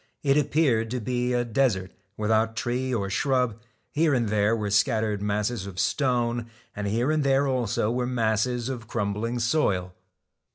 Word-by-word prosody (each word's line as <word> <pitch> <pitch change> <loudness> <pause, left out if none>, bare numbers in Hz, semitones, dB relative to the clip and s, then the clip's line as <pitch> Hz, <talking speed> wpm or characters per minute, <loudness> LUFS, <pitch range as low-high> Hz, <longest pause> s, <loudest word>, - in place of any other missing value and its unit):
It 140 -1 +3
appeared 140 -6 +2
to 125 +2 -2
be 125 +2 -1
a 120 -1 +1
desert, 110 -6 0 0.3
without 110 +1 +1
tree 125 +2 -1
or 105 -5 -1
shrub, 125 -1 +1 0.3
here 155 -2 +2
and 120 -4 0
there 105 +1 +2
were 105 -2 -3
scattered 110 -1 +1
masses 105 0 -1
of 95 -1 -7
stone, 120 -3 0 0.3
and 105 0 -3
here 120 +8 +1
and 155 -1 +1
there 140 +1 +3
also 120 -4 0
were 125 0 -1
masses 120 0 0
of 120 -4 -5
crumbling 110 +2 -2
soil. 110 - 0
115 Hz, 160 wpm, -26 LUFS, 105-125 Hz, 0.3 s, It